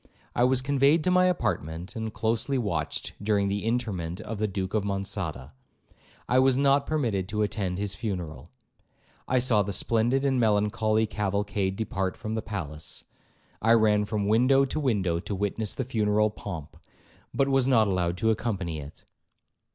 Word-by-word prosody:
I 120 - +4
was 130 0 +2
conveyed 140 +3 +3
to 180 - +2
my 180 0 +5
apartment, 90 - -2
and 110 -1 -3
closely 115 +6 0
watched 85 -11 -2
during 100 -1 +1
the 100 +1 -2
interment 105 -8 -2
of 110 -2 -6
the 110 - +1
Duke 95 -1 -4
of 110 -2 +1
Monçada. 95 - -4 0.8
I 125 - +4
was 130 -1 +4
not 140 0 +3
permitted 115 -12 -1
to 105 +1 0
attend 95 -3 -2
his 100 0 -2
funeral. 90 - -5 0.8
I 130 - +2
saw 120 -4 +3
the 100 0 -2
splendid 120 +7 +1
and 135 -2 +2
melancholy 110 0 +2
cavalcade 100 -2 -1
depart 95 -3 -2
from 110 -1 -5
the 110 - -1
palace. 80 -8 -6 0.6
I 115 +2 +5
ran 105 -2 +4
from 105 -1 -2
window 130 +5 +4
to 135 - -3
window 100 - +1
to 100 - -4
witness 105 +2 -2
the 130 - -2
funeral 105 -3 +1
pomp, 85 -8 -8 0.5
but 135 - +1
was 135 -2 +2
not 115 -5 +4
allowed 90 -2 0
to 110 +2 +2
accompany 95 -8 -2
it. 70 +1 -11
105 Hz, 165 wpm, -27 LUFS, 95-120 Hz, 0.8 s, my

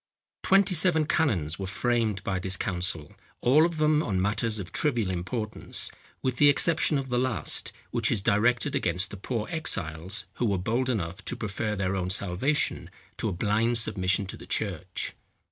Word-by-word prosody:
Twenty 195 -1 +4
seven 160 -2 +4
canons 100 - +1
were 95 - -3
framed 110 -1 0
by 95 -4 -1
this 95 +1 0
council; 90 -4 -2 0.3
all 150 +7 +5
of 170 -2 -6
them 155 0 +3
on 100 -10 -1
matters 105 +3 +1
of 95 -4 -6
trivial 120 - 0
importance 105 +5 -3 0.3
with 130 -2 -1
the 145 +1 +7
exception 155 +1 +3
of 135 -1 -4
the 125 0 +1
last, 120 - -1 0.2
which - - +1
is 100 -4 0
directed 120 +7 +2
against 90 +3 -1
the - - -6
poor 110 +2 -3
exiles 95 - -1
who 120 - +1
were 100 -2 +1
bold 120 +8 0
enough 95 -7 -2
to - - -2
prefer 105 0 -3
their 95 -1 -1
own 90 -1 -2
salvation 100 +11 0 0.3
to 110 - -1
a - - -3
blind 110 +5 +1
submission 95 -3 +2
to 95 - -7
the - - -12
church. 90 -3 -3
105 Hz, 175 wpm, -27 LUFS, 95-130 Hz, 0.3 s, the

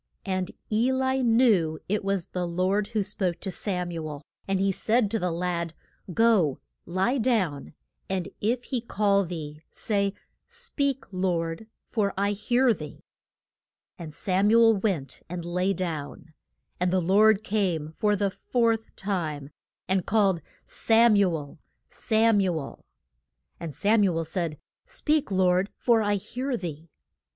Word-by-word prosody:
And 185 -2 -1 0.2
E 230 +4 +2
li 260 0 +1
knew 225 -10 +3
it 205 +1 -1
was 195 -3 -1
the 180 -1 -3
Lord 185 +4 0
who 215 -2 -1
spoke 185 -3 -2
to 190 - -3
Sam 180 -3 -3
u 165 -2 -4
el. 145 -1 -8 0.2
And 195 -1 +1
he 195 0 +2
said 215 +3 +1
to 225 - 0
the 180 - 0
lad, 170 -1 -2 0.4
Go, 195 - +3 0.3
lie 190 +10 +1
down, 190 - 0 0.3
and 190 -2 -1
if 235 +4 0
he 250 -2 -3
call 200 -3 +2
thee, 155 -4 -6
say, 200 -2 0 0.3
Speak, 290 - -2
Lord, 180 0 -1 0.2
for 205 -4 -1
I 200 +1 +1
hear 240 +4 +2
thee. 150 -6 -9 1.0
And 165 -3 -7
Sam 190 +6 +1
u 230 +1 +6
el 225 -2 +5
went 190 -9 -2
and 175 -1 -5
lay 180 +2 0
down. 165 -4 -5 0.5
And 180 0 +2
the 185 - +3
Lord 205 +4 +4
came 185 -8 -1
for 210 -1 +2
the 200 -1 0
fourth 230 0 0
time, 155 -8 -3 0.4
and 190 0 +1
called, 195 -5 +2 0.2
Sam 230 0 +4
u 195 -4 +3
el 145 -2 -10 0.3
Sam 220 -1 +2
u 180 -4 +1
el! 140 - -9 0.8
And 160 -5 -6
Sam 210 +7 +3
u 180 -4 +2
el 165 - -1
said, 160 -1 -3 0.3
Speak, 300 -1 0
Lord, 185 0 +2
for 235 -2 +3
I 205 -1 +1
hear 250 +6 -3
thee. 165 -3 -7
195 Hz, 155 wpm, -26 LUFS, 170-220 Hz, 1.0 s, u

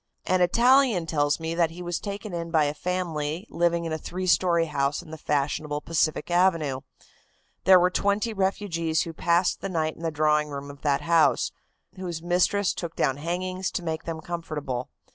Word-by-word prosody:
"An 185 0 +2
Italian 235 0 +4
tells 145 -2 +1
me 160 0 -3
that 165 -1 +2
he 175 +2 -9
was 175 -1 -2
taken 205 -1 -6
in 170 -1 -4
by 160 -2 +3
a 145 0 0
family 170 -1 -3
living 170 0 +1
in 165 - -3
a 155 - -2
three 185 +3 -5
story 175 -2 +3
house 140 -2 -1
in 155 - -13
the - - -5
fashionable 145 +1 -1
Pacific 155 +1 -1
Avenue. 165 -7 +2 0.8
There 190 -1 +8
were 180 +1 +3
twenty 205 +4 0
refugees 190 -5 0
who 165 - -7
passed 170 +2 +1
the 195 - -3
night 160 -3 -1
in - - -14
the 165 - -1
drawing 150 0 +1
room 140 0 -6
of 140 - -15
that 140 -2 +1
house, 165 -1 +3 0.5
whose 175 -3 -4
mistress 180 +3 +1
took 170 -2 -6
down 135 -2 +1
hangings 185 +4 -2
to 180 - -2
make 160 -1 -3
them 165 -1 -4
comfortable. 150 -7 -4
165 Hz, 185 wpm, -26 LUFS, 155-180 Hz, 0.8 s, There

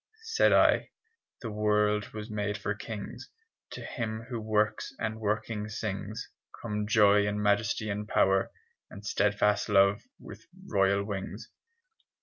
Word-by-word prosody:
Said 455 +1 +3
I - - +4 0.5
"The 115 - -4
world 105 0 +1
was 105 0 -6
made 105 -2 -2
for 100 0 -2
kings: 105 0 -7 0.4
To - - -7
him 110 -3 -4
who 120 -3 -4
works 110 0 0
and 110 0 -3
working 105 0 -2
sings 105 +1 -4 0.3
Come 105 -2 -3
joy 105 -1 +5
and 105 0 -1
majesty 105 +1 +1
and 105 +1 -4
power 95 -2 +3 0.4
And 100 0 -11
steadfast 100 +1 +1
love 100 0 +4 0.2
with - - -12 0.2
royal 100 0 +2
wings." 100 -2 -6
105 Hz, 135 wpm, -29 LUFS, 100-110 Hz, 0.5 s, joy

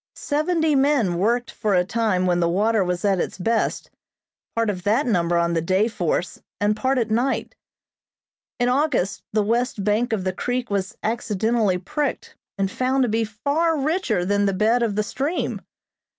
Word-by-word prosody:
Seventy 315 +1 0
men 265 -11 +2
worked 240 +5 +1
for 210 -4 0
a 180 0 +3
time 210 -3 0
when 175 -1 +2
the 170 -1 +2
water 210 +4 +2
was 180 +1 -2
at 195 -2 +2
its - - -3
best, 225 +5 -1 0.6
part 230 0 +1
of 185 -3 -6
that 215 +9 +1
number 175 -7 +1
on 170 0 +1
the 165 - +1
day 185 +6 +2
force 180 -5 -2 0.2
and 210 +1 +2
part 260 +4 0
at 230 -3 0
night. 245 +5 0 1.1
In 245 - +2
August 255 - +1
the 215 0 +2
west 230 -1 0
bank 215 +4 +1
of 215 -4 -1
the 185 0 -1
creek 245 +3 -3
was 200 0 -2
accidentally 220 -2 0
pricked 285 - -3 0.2
and 195 -1 -1
found 260 +1 +1
to 245 - +1
be 225 +1 +1
far 285 +10 0
richer 305 - 0
than 205 +1 +2
the 195 - +1
bed 220 +5 +2
of 225 -4 0
the 210 - +1
stream. 280 +10 -2
220 Hz, 180 wpm, -23 LUFS, 190-250 Hz, 1.1 s, a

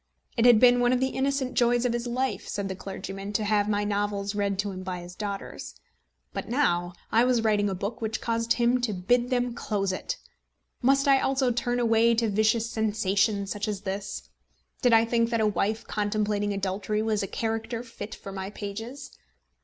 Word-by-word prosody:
It 230 - +2
had 240 -3 +7
been 245 0 +6
one 245 0 +3
of 250 - +2
the 260 +1 +1
innocent 265 -1 -1
joys 240 0 +3
of 245 - +1
his 240 0 -2
life, 255 +2 -2
said 200 -1 -3
the 190 - -3
clergyman, 195 +1 -6
to 215 - 0
have 205 0 +2
my 205 0 +1
novels 205 -1 -1
read 200 -1 0
to 200 +1 -1
him 185 -1 -6
by 185 -1 -4
his 175 +1 -10
daughters. 200 0 -6 0.6
But - - -5
now 175 -9 +1 0.2
I 230 +2 +5
was 245 -2 +2
writing 205 -2 +2
a 190 - -2
book 200 +6 -4
which 220 0 -2
caused 230 0 0
him 240 +1 +2
to 235 -4 0
bid 240 +7 +1
them 245 -1 0
close 200 -4 -1
it! 485 - -4 0.6
Must 275 +2 +3
I 275 -1 +6
also 265 -2 +1
turn 245 +1 -1
away 230 0 +4
to 225 -1 +1
vicious 220 +2 +2
sensation 210 -2 +1
such 205 +1 -3
as 205 -2 -3
this? 195 0 -4 0.6
Did 245 - +4
I 225 0 +6
think 230 0 +1
that 230 -1 0
a 220 - +3
wife 215 +1 0
contemplating 205 0 -1
adultery 200 +2 -1
was 220 -1 0
a 195 - -2
character 225 +3 -3
fit 230 -3 -8
for 195 - -9
my 190 0 -5
pages? 220 +6 -7
220 Hz, 200 wpm, -27 LUFS, 200-240 Hz, 0.6 s, had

